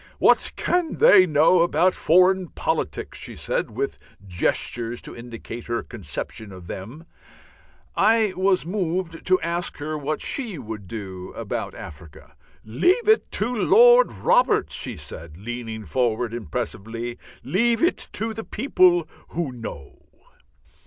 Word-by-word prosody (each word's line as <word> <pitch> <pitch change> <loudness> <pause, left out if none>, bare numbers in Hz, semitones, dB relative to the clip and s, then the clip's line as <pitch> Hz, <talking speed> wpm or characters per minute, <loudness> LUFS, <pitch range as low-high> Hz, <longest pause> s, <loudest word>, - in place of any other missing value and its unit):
"What - - +3
can 355 -3 0
they 450 - +7
know 160 +3 +4
about 180 +2 +3
foreign 185 +2 +3
politics?" - - -3
she - - -7
said, - - -2
with - - -4 0.3
gestures 115 +6 -1
to - - -8
indicate 115 0 -9
her 120 0 -2
conception 105 - -6
of 95 -2 -11
them. 115 - -8 0.9
I 215 -1 +3
was 185 -1 +2
moved 175 -2 -3
to 185 0 +4
ask 170 +1 -3
her 155 +1 -4
what 150 +1 -3
she 235 - 0
would 110 -6 -8
do 95 -3 -7
about - - -4
Africa. 75 0 -12 0.3
"Leave 355 - +2
it 435 0 +4
to 240 +4 0
Lord 485 - +6
Robert!" - - +2
she - - -4
said, 80 -1 -8
leaning 110 0 -6
forward 120 -2 0
impressively. 115 +3 -5 0.3
"_Leave 230 +5 +1
it 350 - +1
to 220 +1 -2
the 225 +1 -6
people 180 - +2 0.2
who 165 -5 -3
know. 115 - -9
155 Hz, 130 wpm, -23 LUFS, -, 0.9 s, they